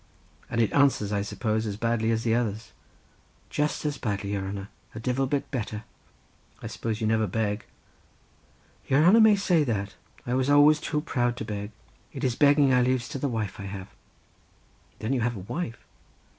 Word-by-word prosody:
"And - - -2
it 110 - +1
answers, 135 -8 +3
I 100 - +1
suppose, 110 +2 -2
as 100 -1 -4
badly 115 0 0
as 115 0 0
the 115 - +1
others?" 110 -2 -2 0.8
"Just 150 +1 -1
as 145 -2 -2
badly, 100 -3 -2
your 100 - -1
hanner; 100 +1 -5 0.3
divil 125 +4 0
a - - -4
bit 140 +1 -2
better." 110 -4 -4 0.8
"I - - -10
suppose 115 -1 -4
you - - 0
never 110 0 +2
beg?" 105 +1 -2 1.2
"Your 135 +3 +4
hanner 205 +7 +7
may 220 -1 +7
say 180 -5 +2
that; 100 -6 -2 0.3
I 120 - -2
was 130 +1 +1
always 145 +1 +6
too 150 0 -2
proud 120 -5 -1
to 110 - -4
beg. 105 -1 -4 0.4
It - - -6
is 125 -2 +1
begging 145 -1 +5
I 125 - +5
laves 125 -1 +1
to 135 - -5
the 140 - -1
wife 110 -5 -3
I 100 - -6
have." 95 -1 -7 1.1
"Then 110 +5 -2
you 130 - 0
have 120 +1 0
a - - -6
wife?" 115 - -5
115 Hz, 185 wpm, -27 LUFS, 105-140 Hz, 1.2 s, hanner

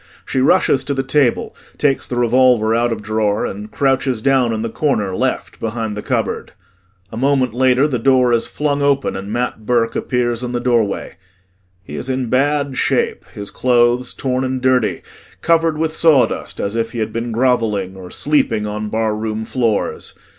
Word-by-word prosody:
She 130 - -1
rushes 135 0 +3
to 140 - -1
the 135 - -1
table, 135 -2 +1 0.2
takes 140 -2 +1
the 125 - -4
revolver 120 -2 +3
out 120 +1 +1
of 110 -2 -4
drawer 110 -1 0
and 105 +2 -6
crouches 135 -2 0
down 130 -1 +2
in 110 -1 -2
the 115 - -2
corner, 105 -11 0
left, - - -2
behind 110 -1 -3
the 105 - -4
cupboard. - - -2 0.6
A 110 - -7
moment 130 -2 +1
later 130 +3 +3
the 130 -5 -2
door 125 0 +3
is 115 - +1
flung 145 -1 -1
open 140 -1 +1
and 100 +1 -6
MAT 120 -3 -3
BURKE 115 -2 +1
appears 120 -2 -1
in 125 -1 -4
the 120 - 0
doorway. 115 -5 0 0.7
He - - -8
is 130 - -5
in 130 -2 -1
bad 140 0 +1
shape - - 0
his 100 -1 -7
clothes 120 0 +2
torn 130 -1 -1
and 130 0 -2
dirty, 125 -3 +1 0.4
covered 165 -1 +2
with 160 0 -1
sawdust 155 -6 +2
as 100 +2 -2
if 115 -1 -2
he - - -6
had 110 -1 -2
been 115 +1 -3
grovelling 110 -6 0
or 95 -1 -10
sleeping 115 -7 0
on 105 0 -4
barroom 110 0 -2
floors. 115 -3 -2
120 Hz, 175 wpm, -18 LUFS, 110-130 Hz, 0.7 s, rushes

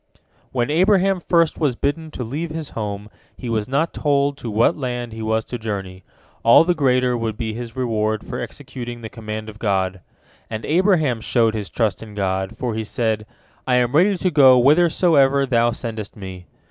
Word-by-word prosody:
" - - -38
When 120 +1 -1
Abraham 190 +3 +3
first 170 -2 +1
was 145 -6 +1
bidden 155 +5 -2
to 130 - -6
leave 150 +9 -4
his 155 -2 -6
home, 105 -2 -5 0.3
he 125 - -6
was 110 -2 -1
not 150 +5 0
told 140 -1 +1
to 120 - -6
what 115 +9 +3
land 125 -4 -4
he 110 - -7
was 110 0 0
to 120 - -6
journey—all 100 - +1
the 180 +1 +2
greater 125 -5 +2
would 115 -2 -3
be 110 -2 -3
his 115 0 -7
reward 110 -4 -1
for - - -5
executing 120 -2 -7
the 110 - -7
command 110 -1 -6
of 110 -1 -10
God. 95 -4 -1 0.5
And 110 -1 -5
Abraham 160 - +2
showed 115 -1 +2
his 105 -5 -4
trust 105 +2 -1
in 110 -2 -10
God, 95 -1 -2
for 125 -3 -2
he 110 0 -2
said, 110 -1 -2 0.4
"I 125 - +3
am 125 -1 +2
ready 190 +5 +4
to 185 +1 0
go 135 -4 +7
whithersoever 145 -1 +4
Thou 120 -2 +2
sendest 115 -3 -5
me." 95 -3 -9
120 Hz, 185 wpm, -21 LUFS, 110-145 Hz, 0.5 s, go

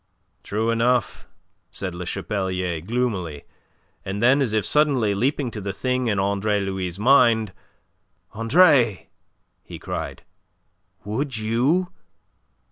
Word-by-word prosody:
"True 110 +3 -1
enough," 120 0 0 0.4
said 95 -1 -5
Le 90 0 -6
Chapelier 95 -5 -2
gloomily; 95 -8 -2 0.6
and 95 +1 -4
then, 130 +5 +4
as 125 -5 0
if 110 -2 0
suddenly 135 -8 +2
leaping 125 +4 -1
to 105 - -6
the 100 0 -4
thing 125 +4 -1
in 105 -3 0
Andre 100 +1 0
Louis' 95 -2 -3
mind: 115 -3 +4 0.8
"Andre!" 115 - +3 0.5
he - - -9
cried. - - -6 0.8
"Would 120 +5 -3
you..." 130 - +1
110 Hz, 115 wpm, -23 LUFS, 100-125 Hz, 0.8 s, then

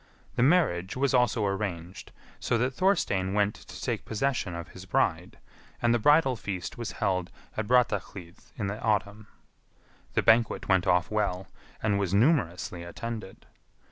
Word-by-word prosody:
The - - 0
marriage 125 - +2
was 135 0 +1
also 125 -4 +3
arranged, 95 -3 -4 0.3
so 120 - 0
that 125 +3 0
Thorstein 100 - +1
went 105 0 +2
to - - -12
take - - -2
possession 110 -5 -1
of 85 -1 -7
his - - -11
bride, - - 0 0.4
and 120 0 +2
the 120 - +2
bridal 145 +1 +4
feast 100 -5 -5
was 120 -1 -5
held 95 -4 -1 0.3
at 110 -1 -2
Brattahlid 100 -7 0 0.2
in 105 - -2
the 100 +2 -4
autumn. 105 -1 -1 0.9
The - - +2
banquet 115 0 +3
went 95 -2 +2
off 90 +3 +2
well, 95 -3 -1 0.3
and 100 -2 +2
was 100 -1 0
numerously 100 - +1
attended. 110 +4 -7
105 Hz, 150 wpm, -28 LUFS, 95-120 Hz, 0.9 s, bridal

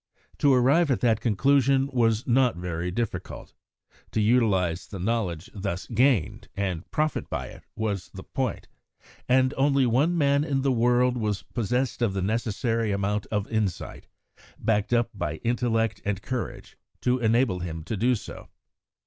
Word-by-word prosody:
To 145 - +4
arrive 135 +6 +4
at 130 - +1
that 115 -3 +2
conclusion 135 +4 +3
was 115 -2 +2
not 125 -2 +3
very 90 0 -3
difficult; 115 +6 -4 0.6
to - - -2
utilise 105 -7 +2
the 100 - -7
knowledge 95 -4 -2
thus 95 -2 -4
gained, 120 - +1
and 95 -4 -3
profit 155 0 -1
by - - -4
it, - - -14
was 100 -6 -3
the 95 - -9
point, 130 -3 -3 0.6
and 130 +1 +4
only 135 -1 +3
one 140 +9 +2
man 140 -2 +3
in 140 -3 -1
the 135 - +2
world 125 +1 +3
was 105 -4 -2
possessed 125 +3 -2
of 105 -5 +1
the 95 - -1
necessary 115 +1 -1
amount 100 +1 -1
of 105 -1 -2
insight, 105 -5 -2 0.5
backed 105 -1 0
up 120 -1 +2
by 80 -7 -3
intellect 115 -3 0
and 100 -1 -2
courage, 130 -2 -5 0.2
to 125 +1 +1
enable 115 -4 +2
him 80 -2 -5
to 110 - -4
do 125 +5 +2
so. - - -9
115 Hz, 155 wpm, -26 LUFS, 100-125 Hz, 0.6 s, To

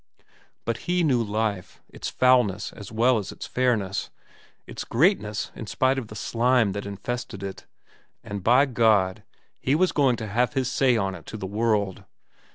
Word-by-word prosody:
But 115 0 -1
he 180 0 +2
knew 130 -6 +3
life, 105 -3 -2
its - - -6
foulness 120 -6 +2
as 100 -1 -10
well 115 +2 +3
as 100 - -6
its - - -8
fairness, 115 -7 0 0.6
its - - -6
greatness 115 - +1
in 110 - -7
spite 130 +5 +1
of 120 - -7
the 105 - -10
slime 115 +1 +2
that 100 +1 -5
infested 100 0 -5
it, 95 -1 -7 0.6
and 100 -2 -6
by 125 +7 +5
God 110 -7 +2 0.4
he 135 - +1
was 185 +3 +3
going 135 -4 +3
to 110 -1 -6
have 120 +4 +1
his 130 -1 0
say 125 -3 +3
on 95 -3 -1
it 85 -3 -11
to 110 - -6
the 95 - -5
world. 105 -1 0
115 Hz, 170 wpm, -25 LUFS, 100-125 Hz, 0.6 s, by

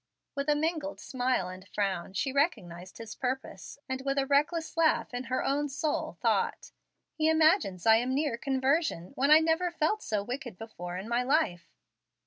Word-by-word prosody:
With 280 +1 -2
a 295 - +4
mingled 305 -1 -2
smile 250 -7 -1
and 185 +1 -10
frown, 190 -3 -2
she 265 +8 -1
recognized 185 - -1
his 225 -1 -8
purpose, 260 +2 -5
and 260 -1 -3
with 275 +1 -1
a 275 - +2
reckless 300 +5 +1
laugh 325 -5 +2
in 245 +1 -4
her 255 +2 -1
own 290 +1 0
soul, 295 +3 -2
thought; - - 0 0.4
"He 315 0 +1
imagines 315 - +3
I 225 0 +7
am 250 +3 0
near 285 -4 0
conversion, 265 - 0
when 275 +2 +1
I 305 - +9
never 325 +2 +1
felt 345 +5 0
so 210 -2 -2
wicked 245 -2 -6
before 180 -5 -7
in 190 +3 -6
my 235 +1 +1
life." 250 - +1
265 Hz, 175 wpm, -29 LUFS, 220-300 Hz, 0.4 s, I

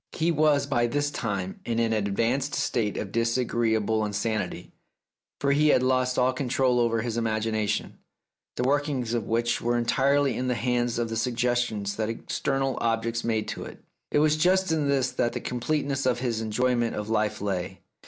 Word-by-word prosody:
He 165 +1 +1
was 150 -2 +3
by 120 -4 +1
this 145 +4 -1
time 100 -7 -3
in 115 -1 -2
an 115 -1 +1
advanced 115 +7 0
state 110 -4 -1
of 100 -2 -5
his 115 +1 +1
agreeable 110 -3 +1
insanity, 105 +1 -3 0.7
for 140 - +1
he 150 +2 +3
had 130 -4 +4
lost 130 0 +1
all 130 +1 +3
control 130 -1 +1
over 115 -2 +1
his 120 -1 -3
imagination, 110 -2 -1 0.6
the - - -1
workings 135 -3 0
of 115 -4 -1
which 115 +1 0
were 120 +1 +1
entirely 135 +2 +2
in 125 +2 -2
the 125 - +1
hands 120 -1 0
of 120 -1 -1
the 115 - -3
suggestions 120 -3 -1
that 110 0 -1
external 135 +3 -2
objects 115 0 0
made 110 -2 -1
to - - -5
it. - - -11 0.3
It - - +1
was 155 +1 +3
just 185 +3 +3
in 150 -3 +1
this 135 -2 +1
that 120 - 0
the 125 - -3
completeness 135 +2 -1
of 125 -1 +2
his 120 -3 -2
enjoyment 120 +2 0
of 105 0 -4
life 110 -1 0
lay. 95 -2 -3
120 Hz, 180 wpm, -26 LUFS, 110-135 Hz, 0.7 s, had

